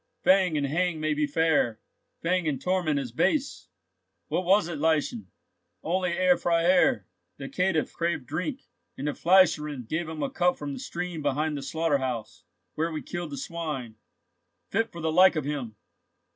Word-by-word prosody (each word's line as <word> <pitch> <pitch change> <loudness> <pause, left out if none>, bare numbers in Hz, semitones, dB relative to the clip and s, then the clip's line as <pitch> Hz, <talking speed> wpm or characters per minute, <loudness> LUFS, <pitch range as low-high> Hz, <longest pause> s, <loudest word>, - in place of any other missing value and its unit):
Fang 185 -4 +4
and 145 - 0
hang 165 +3 0
may 155 0 0
be 150 0 0
fair; 145 -7 +1 0.4
fang 180 0 +1
and 140 -3 -1
torment 180 -5 0
is 130 -4 -5
base! 280 - 0 0.6
What 185 - -1
was 190 -1 +4
it, 165 -4 -5
Lieschen?" 150 - 0 0.6
"Only, 180 +1 0
Herr 180 0 +3
Freiherr, 170 - +3 0.3
the 135 - -6
caitiff 180 0 0
craved 170 -6 -2
drink, 180 - -4 0.3
and 140 - -3
the - - +1
fleischerinn 150 -8 +3
gave 160 +3 -2
him 160 -1 -4
a 270 - -2
cup 180 -8 +1
from 145 -1 -5
the - - -6
stream 175 -2 -5
behind 150 +2 0
the 140 - -4
slaughter 150 +1 0
house, 125 -4 -5 0.3
where 165 +2 -1
we 155 - -5
killed 175 -2 -5
the 140 - -6
swine. 135 -7 -5 0.7
Fit 225 +3 0
for 170 - -8
the 160 0 0
like 185 +2 +6
of 155 -3 -2
him!" 135 -7 -4
160 Hz, 170 wpm, -27 LUFS, 145-180 Hz, 0.7 s, like